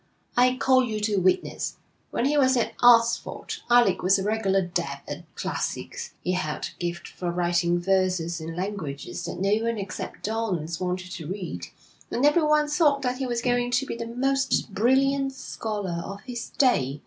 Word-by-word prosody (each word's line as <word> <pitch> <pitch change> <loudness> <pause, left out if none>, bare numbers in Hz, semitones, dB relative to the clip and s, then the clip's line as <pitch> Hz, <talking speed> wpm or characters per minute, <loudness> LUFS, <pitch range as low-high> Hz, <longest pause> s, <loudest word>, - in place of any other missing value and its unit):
'I 250 +1 +4
call 260 -1 +4
you 220 -3 -2
to 210 -1 0
witness. 185 0 0 0.3
When 235 - -1
he 290 +2 +2
was 260 -3 +4
at 235 - 0
Oxford, 235 -1 +4
Alec 235 -7 +5
was 190 +2 +4
a 190 - -2
regular 200 -2 +1
dab 175 0 -3
at - - -6
classics; 475 -1 -4
he 180 - 0
had 170 -5 -2
a - - -32
gift 170 -1 -3
for 180 - -5
writing 175 0 +1
verses 180 -2 +1
in 165 +1 -6
languages 180 -7 -4
that - - -5
no 195 +2 +2
one 230 0 0
except 195 -2 -6
dons 185 -8 -2
wanted 180 0 -3
to 160 -4 -6
read, 175 - -5 0.4
and 250 - +1
everyone 300 0 +4
thought 295 -2 +2
that 250 0 -1
he 265 - -1
was 240 -1 -2
going 245 -1 +1
to 250 +2 +1
be - - -4
the 230 0 -5
most 265 -2 0
brilliant 270 +5 +2
scholar 205 -9 -4
of 200 +1 -7
his 245 -2 -6
day.' 145 - +2
210 Hz, 175 wpm, -26 LUFS, 180-255 Hz, 0.4 s, Alec